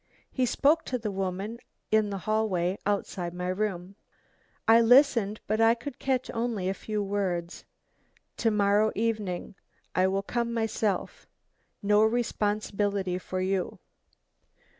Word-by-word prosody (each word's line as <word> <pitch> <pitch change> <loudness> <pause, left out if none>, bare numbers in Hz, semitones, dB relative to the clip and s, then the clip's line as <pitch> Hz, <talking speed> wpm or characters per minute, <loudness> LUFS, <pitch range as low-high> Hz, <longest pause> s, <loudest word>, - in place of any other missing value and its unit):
He 255 -2 +1
spoke 305 +7 +3
to 255 - -2
the 220 -3 -4
woman 195 +4 -3 0.3
in 215 -1 +3
the 200 - -3
hall 215 +2 0 0.4
outside 180 -4 -2
my 180 0 -3
room. 190 -1 -3 0.7
I 225 +1 +7
listened, 230 -4 +4
but 215 +2 0
I 225 +1 +5
could 250 +2 -8
catch 260 -2 -1
only 230 -5 -1
a 190 - +1
few 210 +1 -3
words. 185 -4 -2 0.7
'To 230 - +1
morrow 210 0 +3
evening 210 -5 -2 0.4
I 185 +1 +3
will 195 +1 0
come 235 +2 -2
myself 220 -3 -2 0.6
no 210 +1 +4
responsibility 205 -4 0
for 185 0 -4
you. 190 0 -1
210 Hz, 130 wpm, -28 LUFS, 195-230 Hz, 0.7 s, I